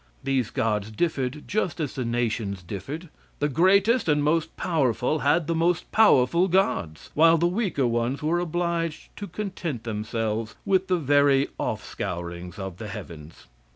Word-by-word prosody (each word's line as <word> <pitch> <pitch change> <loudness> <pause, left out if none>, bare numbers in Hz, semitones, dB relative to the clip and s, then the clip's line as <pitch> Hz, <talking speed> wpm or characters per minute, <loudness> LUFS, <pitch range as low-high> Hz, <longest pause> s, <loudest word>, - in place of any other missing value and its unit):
These 130 -4 0
gods 105 -2 -1
differed 135 +2 -2
just 185 -5 -1
as 150 -4 -2
the 130 - -3
nations 115 -5 -2
differed; 135 - -6 0.3
the 145 - +1
greatest 195 - +3
and 150 -1 +3
most 160 +2 0
powerful 150 - +1
had 165 +2 +2
the 165 - 0
most 165 +1 0
powerful 170 - +5
gods, 100 - 0
while 165 +2 +6
the 170 - +1
weaker 180 - 0
ones 120 +4 -1
were 165 +3 +1
obliged 170 -1 -2
to 205 - -5
content 180 - -4
themselves 110 0 -3
with 190 -1 +2
the 185 - +2
very 145 -2 +3
off - - -2
scourings 85 0 -5
of 95 -3 -6
the 110 - -7
heavens. 80 -5 -9
145 Hz, 155 wpm, -25 LUFS, 110-170 Hz, 0.3 s, while